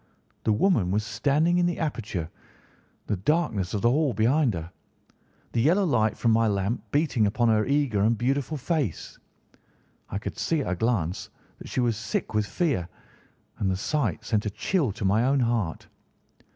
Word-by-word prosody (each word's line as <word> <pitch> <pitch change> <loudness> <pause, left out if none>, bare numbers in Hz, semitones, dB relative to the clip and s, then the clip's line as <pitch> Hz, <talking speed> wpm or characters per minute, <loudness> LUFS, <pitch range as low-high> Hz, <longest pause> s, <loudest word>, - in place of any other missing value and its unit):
The - - +3
woman 110 - +2
was 105 +3 0
standing 150 +11 +1
in 175 - +3
the 175 - -2
aperture, 110 - -3 0.8
the 105 - -1
darkness 110 - 0
of 105 - -2
the 120 - +5
hall 145 -1 +2
behind 120 +2 +2
her, 85 +1 -6 0.8
the 115 - +1
yellow 180 - +3
light 110 -9 +1
from 115 - +2
my 115 0 +3
lamp 100 +3 -1
beating 140 -8 +2
upon 120 +3 +1
her 110 0 +2
eager 140 -7 +1
and 110 +2 +3
beautiful 135 +5 -1
face. 145 - -3 0.9
I - - -3
could 105 - -6
see 160 -3 0
at 110 - -2
a - - 0
glance 95 -4 -1 0.3
that - - -10
she 130 - -1
was 120 -3 +1
sick 110 0 -3
with 105 -1 +1
fear, 135 - -1 0.7
and 95 - +1
the 95 - 0
sight 115 - -1
sent 105 -3 0
a - - 0
chill 145 - 0
to 100 - -4
my 105 +4 +3
own 135 +2 +2
heart. 115 -8 -1
115 Hz, 180 wpm, -26 LUFS, 105-145 Hz, 0.9 s, the